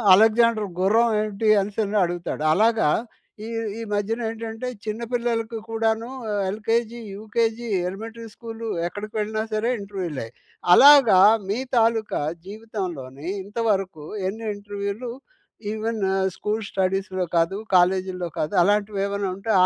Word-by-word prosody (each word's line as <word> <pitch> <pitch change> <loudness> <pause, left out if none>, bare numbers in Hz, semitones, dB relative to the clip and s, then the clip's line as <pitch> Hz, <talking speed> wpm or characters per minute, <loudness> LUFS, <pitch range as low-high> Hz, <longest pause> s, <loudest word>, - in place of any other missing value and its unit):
"Alexander 220 0 +4
గుర్రం 220 +5 +4
ఏంటి?" 215 0 -2
అనేసని 205 +1 -1
అడుగుతాడు. 175 -3 -4
అలాగా 225 -4 +3 0.6
ఈ - - -6 0.3
ఈ - - -5
మధ్యన 210 +3 -1
ఏంటంటే 225 +2 -5 0.2
చిన్న 215 +1 -3
పిల్లలకి 235 -2 -1
కూడాను, 225 0 0 0.4
ఎల్‍కేజీ, 225 +3 -1 0.2
యూకేజీ, 225 +2 -1 0.2
ఎలిమెంటరీ 225 +4 -7
స్కూలు 230 -1 -7 0.2
ఎక్కడికి 210 +4 -7
వెళ్ళినా 215 +1 -1
సరే 215 +2 0
ఇంటర్వ్యూలే. 185 - -5 0.5
అలాగా, 270 -6 +8 0.3
మీ 210 +5 0 0.2
తాలూకా 225 -6 +2 0.3
జీవితంలోనీ 180 - -6 0.2
ఇంతవరకు 200 -6 -1 0.2
ఎన్ని 220 +3 -7
ఇంటర్వ్యూలు 205 +3 -5 0.6
ఈవెను 220 -3 -1 0.2
స్కూల్ 215 +1 -2
స్టడీస్‌లో 190 -1 -1
కాదు, 165 +4 +2 0.2
కాలేజీల్లో 185 0 +2
కాదు 155 - -2
అలాంటివి 205 +1 +1
ఏమన్నా 200 -1 -2
ఉంటే, 220 +3 -3
215 Hz, 115 wpm, -24 LUFS, 195-225 Hz, 0.6 s, అలాగా